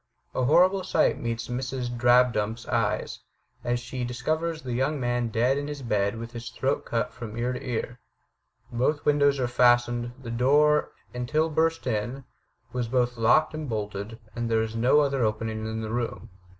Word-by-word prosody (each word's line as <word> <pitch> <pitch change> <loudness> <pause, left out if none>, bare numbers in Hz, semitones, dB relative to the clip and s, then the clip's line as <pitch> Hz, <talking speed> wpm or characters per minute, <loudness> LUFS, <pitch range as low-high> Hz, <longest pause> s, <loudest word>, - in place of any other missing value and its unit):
A 130 - 0
horrible 180 +6 +4
sight 185 - +2
meets 115 0 -3
Mrs. 125 0 -3
Drabdump's 120 -2 +3
eyes, - - -1 0.4
as 120 0 0
she 125 +1 -5
dis 125 +1 -5
covers 160 0 -1
the 125 -2 -4
young 135 +4 0
man 120 -1 0
dead 120 +5 +1
in 145 - -4
his 145 -2 -6
bed 105 -2 0
with 115 +1 -7
his 120 -1 -7
throat 135 +2 -1
cut 120 +2 -2
from 115 -2 -8
ear 125 +2 -1
to 125 - -6
ear. 125 -1 -3 0.7
Both 130 +5 0
windows 145 -1 +3
are 125 - +1
fastened; 120 -1 +3
the 120 -3 -7
door, 145 +5 +3 0.2
until 150 +6 0
burst 165 +1 +1
in, 120 +3 -2 0.5
was 125 -2 -1
both 125 0 +1
locked 120 +8 +3
and 155 -2 -5
bolted; 105 0 -4 0.2
and 120 0 -2
there 110 -1 +2
is 110 0 -5
no 125 +6 +4
other 140 -3 +1
opening 110 0 -2
in 110 0 -3
the 110 0 -4
room. 120 -3 -3
120 Hz, 175 wpm, -26 LUFS, 115-140 Hz, 0.7 s, horrible